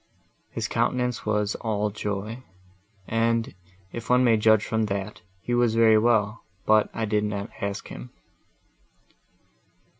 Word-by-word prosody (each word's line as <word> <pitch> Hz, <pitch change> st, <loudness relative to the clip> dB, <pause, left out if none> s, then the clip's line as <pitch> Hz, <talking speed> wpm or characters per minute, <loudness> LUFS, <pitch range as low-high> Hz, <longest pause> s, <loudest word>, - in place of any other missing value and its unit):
His -, -, -3 dB
countenance 125 Hz, -3 st, -1 dB
was 105 Hz, -1 st, +1 dB
all 105 Hz, -2 st, -1 dB
joy, 105 Hz, +3 st, -4 dB, 0.7 s
and, 115 Hz, 0 st, 0 dB, 0.4 s
if 115 Hz, -1 st, -7 dB
one 125 Hz, +1 st, +5 dB
may 115 Hz, -2 st, +5 dB
judge 110 Hz, -1 st, +4 dB
from 110 Hz, -1 st, 0 dB
that, 100 Hz, +1 st, -4 dB, 0.2 s
he 120 Hz, -, -3 dB
was 120 Hz, -2 st, +2 dB
very 110 Hz, -1 st, +6 dB
well; 110 Hz, -2 st, +2 dB, 0.2 s
but 110 Hz, -1 st, +4 dB
I 115 Hz, -, -2 dB
did 105 Hz, 0 st, 0 dB
not 105 Hz, 0 st, -3 dB
ask 100 Hz, 0 st, -3 dB
him." 60 Hz, +1 st, -9 dB
110 Hz, 130 wpm, -25 LUFS, 105-115 Hz, 0.7 s, very